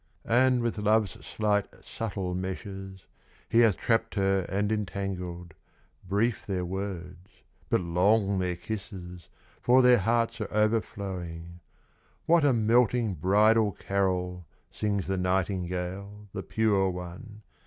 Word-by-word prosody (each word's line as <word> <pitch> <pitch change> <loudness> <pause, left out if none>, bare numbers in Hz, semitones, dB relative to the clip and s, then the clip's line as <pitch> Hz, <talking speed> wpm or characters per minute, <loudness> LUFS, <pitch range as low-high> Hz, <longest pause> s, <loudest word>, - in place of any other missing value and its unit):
And 125 +1 +3
with 115 -2 -1
love's 105 -6 +1
slight, 105 +5 0 0.2
subtle 100 -5 -4
meshes, 95 0 -6 0.4
He 115 - +3
hath 110 -6 +5
trapped 115 -1 0
her 95 -2 +1
and 100 +2 0
entangled; 90 -4 -4 0.6
Brief 105 +4 +1
their 95 -3 -1
words, 90 -1 -6 0.4
but - - +2
long 95 +3 +2
their 90 -1 -1
kisses, 90 -3 -7 0.3
For 125 +1 +5
their 125 -1 +6
hearts 115 +2 0
are 105 - -4
overflowing. 95 -6 -2 0.7
What 170 -1 +4
a 145 - +5
melting 115 -1 +2
bridal 105 +5 +3
carol, 90 -3 -1 0.2
Sings 100 -3 -1
the 95 0 -1
nightingale, 95 +2 -2
the 95 - -4
pure 100 -3 +1
one! 95 +5 -8
100 Hz, 120 wpm, -28 LUFS, 90-110 Hz, 0.7 s, their